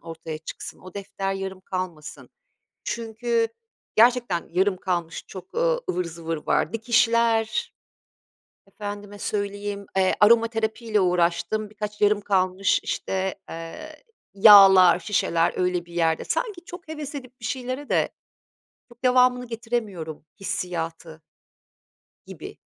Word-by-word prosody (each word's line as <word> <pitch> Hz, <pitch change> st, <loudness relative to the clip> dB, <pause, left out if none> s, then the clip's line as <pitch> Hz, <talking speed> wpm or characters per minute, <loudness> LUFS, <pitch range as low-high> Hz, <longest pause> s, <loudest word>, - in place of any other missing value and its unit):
ortaya 165 Hz, -1 st, -7 dB
çıksın. 155 Hz, -, -8 dB
O 185 Hz, -1 st, -13 dB
defter 195 Hz, -1 st, -4 dB
yarım 190 Hz, -1 st, -5 dB
kalmasın 185 Hz, -5 st, -6 dB, 0.6 s
çünkü 230 Hz, 0 st, -1 dB, 0.5 s
gerçekten 235 Hz, -6 st, +3 dB
yarım 185 Hz, +2 st, +2 dB
kalmış 175 Hz, -3 st, -3 dB
çok, 185 Hz, -2 st, -11 dB
ııı, -, -, +2 dB
ıvır 180 Hz, 0 st, -2 dB
zıvır 165 Hz, -1 st, -5 dB
var. 155 Hz, -, +1 dB
Dikişler, 230 Hz, -1 st, +2 dB, 0.9 s
efendime 205 Hz, 0 st, -8 dB
söyleyeyim, 200 Hz, -1 st, -3 dB
eee, 185 Hz, -1 st, +3 dB
aromaterapiyle 225 Hz, 0 st, +3 dB
uğraştım, 180 Hz, +4 st, +1 dB
birkaç 210 Hz, 0 st, -6 dB
yarım 205 Hz, 0 st, +4 dB
kalmış, 190 Hz, -1 st, +1 dB
işte, 190 Hz, 0 st, -2 dB
eee, 235 Hz, -, -9 dB, 0.3 s
yağlar, 195 Hz, -3 st, +8 dB
şişeler 170 Hz, -5 st, +1 dB
öyle 180 Hz, -1 st, 0 dB
bir 170 Hz, -, -15 dB
yerde 165 Hz, -2 st, +1 dB
sanki 415 Hz, -7 st, -2 dB
çok 350 Hz, -2 st, -10 dB
heves 300 Hz, -2 st, -6 dB
edip 255 Hz, -2 st, -9 dB
bir -, -, -6 dB
şeylere 255 Hz, +3 st, -4 dB
de -, -, +2 dB, 0.8 s
çok 240 Hz, +1 st, -19 dB
devamını 250 Hz, 0 st, +4 dB
getiremiyorum 220 Hz, -10 st, -4 dB, 0.2 s
hissiyatı 165 Hz, -4 st, -4 dB, 1.1 s
gibi. -, -, -10 dB
205 Hz, 115 wpm, -24 LUFS, 180-230 Hz, 1.1 s, yağlar